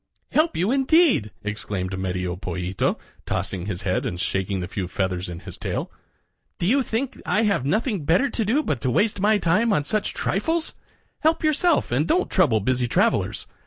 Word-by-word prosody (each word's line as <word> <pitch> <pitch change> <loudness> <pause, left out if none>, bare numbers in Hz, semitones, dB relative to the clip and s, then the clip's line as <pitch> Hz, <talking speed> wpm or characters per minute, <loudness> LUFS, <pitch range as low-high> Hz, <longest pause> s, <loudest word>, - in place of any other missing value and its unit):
"Help 315 - +2
you, 185 +7 +1
indeed!" 275 - +4
exclaimed 100 -3 -3
Medio 90 -1 -2
Pollito, 90 0 -2 0.3
tossing 95 0 -2
his 95 -4 -4
head 95 -1 0
and 90 - -3
shaking 95 +1 -1
the 90 - -4
few 95 -1 -4
feathers 90 -1 -2
in 85 0 -7
his - - -9
tail. - - -3 0.7
"Do - - -2
you 265 +9 +3
think 255 +1 -3
I 215 - +1
have 200 - +1
nothing 210 - 0
to 220 +12 +3
do 250 +9 +1
but 135 - -2
to 130 - 0
waste 205 - +1
my 210 +2 +4
time 205 +5 +2
on 150 -8 +2
such 210 +8 -2
trifles? 325 - -1 0.5
Help 320 +1 +2
yourself 310 - +2
and 140 +6 +1
don't 360 - +1
trouble 125 - +3
busy 125 +3 +1
travelers. - - +1
145 Hz, 175 wpm, -24 LUFS, -, 0.7 s, indeed